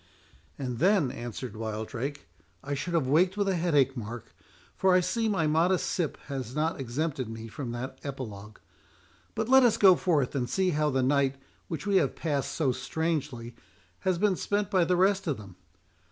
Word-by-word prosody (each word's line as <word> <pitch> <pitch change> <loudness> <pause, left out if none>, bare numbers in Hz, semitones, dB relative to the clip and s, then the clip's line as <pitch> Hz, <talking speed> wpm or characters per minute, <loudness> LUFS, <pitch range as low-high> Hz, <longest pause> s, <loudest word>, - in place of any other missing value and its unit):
"And 125 -4 -4
then," 180 -7 +3
answered 120 -1 -6
Wildrake, 115 +6 -4 0.4
"I 145 - -3
should 170 +5 -2
have 160 -5 +2
waked 175 +8 +3
with 200 -1 +1
a 195 - +2
headache, 145 -6 +2
Mark; 120 0 -7 0.4
for 190 -1 +3
I - - +6
see 205 +6 0
my 190 -6 +1
modest 165 +4 +2
sip 170 -5 -1
has 130 -3 -5
not 155 +1 0
exempted 135 0 -2
me 115 0 -7
from 120 +2 -6
that 120 +2 -6
epilogue.— 110 -7 -7 0.8
But 220 0 -1
let 265 +1 +7
us 240 -4 +4
go 190 -3 +7
forth, 160 -8 +1
and 125 -4 -1
see 185 +7 +1
how 150 -1 +1
the 130 -2 +1
night, 135 0 +2 0.3
which 160 -4 -5
we 200 -1 +3
have 145 -8 +1
passed 145 -4 -2
so 145 -5 +1
strangely, 135 -3 -3 0.4
has 185 -2 0
been 200 +1 +2
spent 205 -1 -1
by 185 -4 +3
the 180 - +2
rest 195 +1 +2
of 150 - 0
them. 100 -4 -12
145 Hz, 180 wpm, -28 LUFS, 125-180 Hz, 0.8 s, let